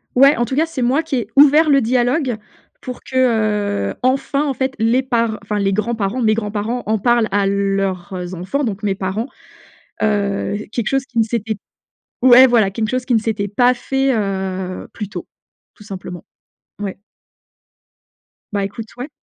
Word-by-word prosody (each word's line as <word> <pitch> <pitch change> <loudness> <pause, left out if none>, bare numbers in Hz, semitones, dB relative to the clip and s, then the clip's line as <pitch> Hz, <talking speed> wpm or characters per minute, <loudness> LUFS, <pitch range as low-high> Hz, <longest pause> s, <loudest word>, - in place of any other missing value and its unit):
Ouais, 275 +3 +6
en 240 - 0
tout 260 - -4
cas, 310 +3 +3
c'est 325 -5 -5
moi 260 +6 +2
qui 320 -3 -3
ai 240 - -2
ouvert 295 +3 +7
le 275 -1 +5
dialogue 250 +2 +1 0.5
pour 250 -1 -7
que, 260 - -10 0.8
heu, - - -9
enfin, 270 +2 +1
en 280 - 0
fait 265 0 -2
les 230 +4 +2
par 230 -4 0
enfin 210 +1 -2
les 195 -1 +1
grands-parents, 215 +2 -1
mes 220 -2 +3
grands-parents, 215 +2 -2
en 220 +1 +1
parlent 235 +1 +2
à 200 0 +2
leurs, 195 -2 -1
heu, 180 0 -5
enfants, 185 +11 -2
donc 205 -3 -4
mes 200 -2 0
parents. 200 +5 -3 0.7
Heu, 205 -1 0
quelque 230 -2 -2
chose 270 -1 0
qui 245 - -10
ne - - +5
s'était 225 -1 -2 0.7
ouais 255 +1 +8
voilà, 230 -5 +3
quelque 215 +2 -2
chose 255 +1 -2
qui 250 - 0
ne 225 - +4
s'était 215 -2 -2
pas 245 +5 +3
fait, 270 +2 0
heu, 190 -3 -3
plus 210 - -6
tôt, - - -7 0.5
tout 210 - -16
simplement. 185 -4 -8 0.6
Ouais. 200 -2 -4 1.6
Bah 200 -1 0
écoute 220 +2 -8
ouais. 255 +5 -6
225 Hz, 180 wpm, -19 LUFS, 200-255 Hz, 1.6 s, ouais